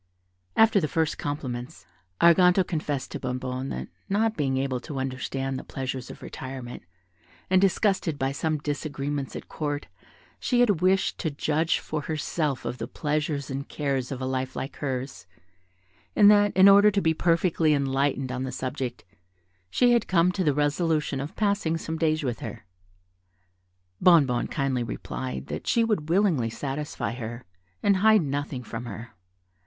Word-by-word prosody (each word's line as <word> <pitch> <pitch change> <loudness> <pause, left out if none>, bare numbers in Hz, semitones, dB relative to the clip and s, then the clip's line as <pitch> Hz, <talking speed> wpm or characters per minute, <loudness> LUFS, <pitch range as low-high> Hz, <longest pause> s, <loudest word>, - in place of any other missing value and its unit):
After 225 -2 +6
the 155 - 0
first 160 0 -1
compliments, 135 -1 -5 0.3
Arganto 180 +2 +6
confessed 150 -5 -3
to - - -4
Bonnebonne 130 +1 -3
that 65 0 -4 0.2
not 220 +3 +1
being 135 -3 0
able 130 -1 -1
to 145 +2 -7
understand 135 0 -3
the - - -8
pleasures 130 -1 -5
of - - -10
retirement, 130 -2 -7 0.7
and 185 0 +5
disgusted 190 -5 +1
by 135 -1 0
some 155 +2 -1
disagreements 145 -1 -3
at - - -7
Court, 145 -2 -3 0.5
she 245 - +1
had 205 -9 +3
wished 185 +1 +2
to 160 - -1
judge 155 +3 0
for 155 - -4
herself 150 -3 -2
of 120 +1 -4
the - - -4
pleasures 150 -2 -2
and 135 +1 -5
cares 135 -3 -2
of 135 - -4
a 130 - -3
life 130 0 -2
like 135 - -5
hers, 130 -9 -4 0.9
and 205 0 +8
that, 205 -1 +5
in 190 +1 +8
order 200 +1 +8
to 205 -1 +1
be 160 -4 +2
perfectly 165 -1 +2
enlightened 135 -2 0
on 130 0 -3
the 130 0 -3
subject, 130 -1 -4 0.6
she 245 - +3
had 235 -2 +2
come 180 -1 +3
to 185 0 -1
the 150 -4 +2
resolution 150 -1 0
of 140 +4 -6
passing 200 -6 +1
some 160 0 -4
days 155 -1 +1
with 120 -5 -2
her. - - -7 1.4
Bonnebonne 150 -9 +5
kindly 135 -3 -1
replied 65 - -5
that - - -6
she 230 - +3
would 205 -9 -1
willingly 170 - +2
satisfy 140 +4 -4
her, 120 0 -6 0.4
and 200 -1 +4
hide 215 -1 +5
nothing 140 -2 -3
from 115 +1 -6
her. 115 +1 -8
145 Hz, 160 wpm, -26 LUFS, 130-170 Hz, 1.4 s, and